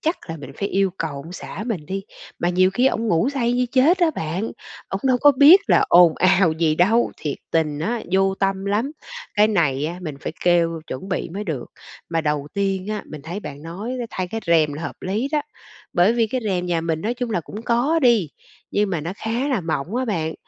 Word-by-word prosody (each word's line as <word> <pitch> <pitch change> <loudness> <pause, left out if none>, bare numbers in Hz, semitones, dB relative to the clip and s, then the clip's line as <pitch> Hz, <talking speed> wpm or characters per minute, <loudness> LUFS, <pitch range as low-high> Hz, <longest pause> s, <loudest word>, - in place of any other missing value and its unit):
chắc 320 +3 0
là 165 - -4
mình 140 -4 -9
phải 200 - -1
yêu 195 -1 +1
cầu 160 -2 -2
ông 160 +5 -8
xã 190 +3 -7
mình 180 -11 -3
đi, 195 +3 -3 0.4
mà 175 - 0
nhiều 185 +1 +3
khi 245 +7 +2
ổng 230 -3 0
ngủ 170 +7 +2
say 245 -4 0
như 250 0 +1
chết 290 +8 +4
á 340 -3 +3
bạn, 180 - -3 0.4
ổng 195 - -3
đâu 255 -1 +4
có 290 0 +7
biết 290 +8 +8
là - - +4
ồn 175 -2 +7
ào 185 -2 +4
gì 160 -1 +1
đâu. 220 +8 +3
Thiệt 145 -3 -4
tình 155 -3 0
á, 225 +8 -2
vô 195 0 +3
tâm 195 0 -1
lắm. 210 +7 0 0.4
Cái 210 +1 +4
này 150 -8 +1
á 175 +3 -5
mình 155 -4 -5
phải - - -4
kêu 170 -2 +2
chuẩn 185 +9 -6
bị 185 - -2
mới 200 +5 -5
được. 150 -10 -4 0.4
Mà 165 -1 0
đầu 150 -1 -1
tiên 195 -2 -1
á, 210 -1 -3
mình 155 -2 -9
thấy 175 +7 -5
bạn 145 -6 -8
nói, 190 +10 -6
a, 235 - -3
thay 185 -1 -3
cái 225 +4 -4
rèm 160 -3 +3
là 150 +3 -6
hợp - - -5
lý 210 +8 -1
đó. 300 - +2 0.5
Bởi 180 +5 +4
vì 235 -1 +2
cái 255 +4 -2
rèm 180 -4 -1
nhà 170 -2 0
mình 165 -1 -2
nói 225 +7 -2
chung 245 -1 -4
là 195 - 0
cũng 210 +7 -9
có 245 +8 +2
đi, 230 -9 +4 0.4
nhưng 205 -1 +1
mà 170 -4 -1
nó 165 +4 -4
khá 235 +6 -2
là 255 -7 +1
mỏng 165 +2 -3
á 260 - 0
bạn. 165 -9 -2
190 Hz, 235 wpm, -22 LUFS, 165-230 Hz, 0.5 s, biết